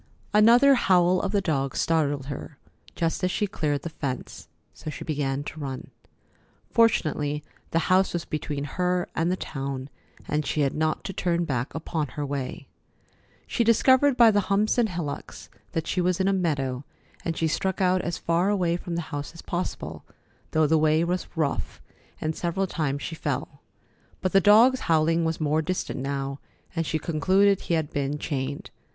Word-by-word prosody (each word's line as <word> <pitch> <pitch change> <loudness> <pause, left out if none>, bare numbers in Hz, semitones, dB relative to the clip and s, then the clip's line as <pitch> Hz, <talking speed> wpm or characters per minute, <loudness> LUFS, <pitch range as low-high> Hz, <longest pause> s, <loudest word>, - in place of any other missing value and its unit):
Another 235 +6 +7
howl 185 -6 +4
of 195 - -2
the 205 -1 +2
dog 140 -7 -1
startled 145 -4 +1
her 140 +1 -7 0.4
just 165 +1 -1
as 185 - +3
she 210 - 0
cleared 150 -7 -2
the 170 - -4
fence, 130 -5 -5 0.3
so 155 - -7
she 150 - -6
began 145 -2 -1
to 155 - -8
run. 135 -3 -6 0.8
Fortunately, 150 -10 +2 0.3
the - - 0
house 190 +1 +3
was 175 -2 -3
between 150 -2 -3
her 180 +4 -1
and 165 +2 +1
the - - +1
town, 135 -5 -5 0.4
and 150 0 0
she 150 - -1
had 140 -2 +1
not 155 0 0
to 195 - -5
turn 175 -1 0
back 125 -4 -2
upon 160 -1 -2
her 145 +2 -4
way. 140 -2 -4 0.8
She 235 - 0
discovered 260 +4 +4
by 235 -2 +8
the 205 - +3
humps 210 +4 +2
and 230 -2 +3
hillocks 170 -6 -6 0.2
that 165 -1 -1
she 180 - 0
was 180 0 +1
in 190 - +2
a 195 - +3
meadow, 140 -8 -1 0.4
and 165 -1 -2
she 165 - +1
struck 190 +4 -1
out 185 -1 +3
as 170 - -3
far 170 +3 +1
away 180 -4 +1
from 175 -1 -5
the 170 - -2
house 145 0 -4
as 165 - -10
possible, 175 +1 -4 0.5
though 155 0 +3
the 160 +1 +3
way 155 +1 +3
was 180 +1 -1
rough, 155 -4 -2 0.4
and 155 0 -2
several 175 +3 -1
times 145 -6 -2
she - - -4
fell. 160 - -4 0.6
But 185 - -1
the 195 - +5
dog's 230 +7 +6
howling 165 +1 +3
was 160 0 -1
more 155 0 +1
distant 185 -2 -3
now, 140 0 -3 0.4
and 165 -2 -1
she 160 - 0
concluded 185 +6 +3
he 170 - 0
had 160 -2 -1
been 140 +1 -1
chained. 140 -2 -4
165 Hz, 180 wpm, -26 LUFS, 145-185 Hz, 0.8 s, by